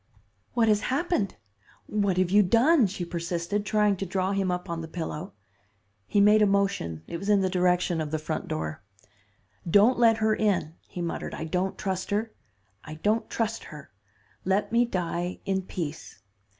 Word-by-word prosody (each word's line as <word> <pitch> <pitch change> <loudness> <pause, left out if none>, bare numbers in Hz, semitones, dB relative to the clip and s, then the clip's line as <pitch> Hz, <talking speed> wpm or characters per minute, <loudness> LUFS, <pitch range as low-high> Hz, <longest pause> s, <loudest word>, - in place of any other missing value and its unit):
"'What 230 -2 +3
has 210 -1 +4
happened? 270 - 0 0.5
What 200 -3 0
have 185 -1 +2
you 205 +1 +6
done?' 235 - +4
she 185 -2 -5
persisted, 170 +3 -2
trying 210 -2 +2
to 195 - -3
draw 185 +1 0
him 195 -1 0
up 180 +1 -2
on 170 -1 -3
the 165 - -6
pillow. 170 +2 -5 0.7
He 205 - +2
made 210 +1 +6
a 210 - +5
motion. 195 - 0
It 170 - -5
was 195 +4 -5
in 205 -2 +5
the 185 -1 0
direction 180 -2 +2
of 155 - -3
the 155 - -1
front 155 +1 -4
door. 80 -1 -4 0.9
'Don't 210 +8 +5
let 225 -2 +5
her 220 -1 +2
in,' 195 -8 0
he 175 - -5
muttered. 170 - -4
'I - - -5
don't 180 +4 -1
trust 190 -2 -3
her, 215 +2 -1 0.5
I 155 - -8
don't 210 +8 0
trust 225 -1 -2
her. 150 -7 -11 0.5
Let 195 +4 0
me 235 +1 +4
die 175 -3 -3
in 190 -1 0
peace. 165 -4 -6
190 Hz, 175 wpm, -27 LUFS, 170-210 Hz, 0.9 s, you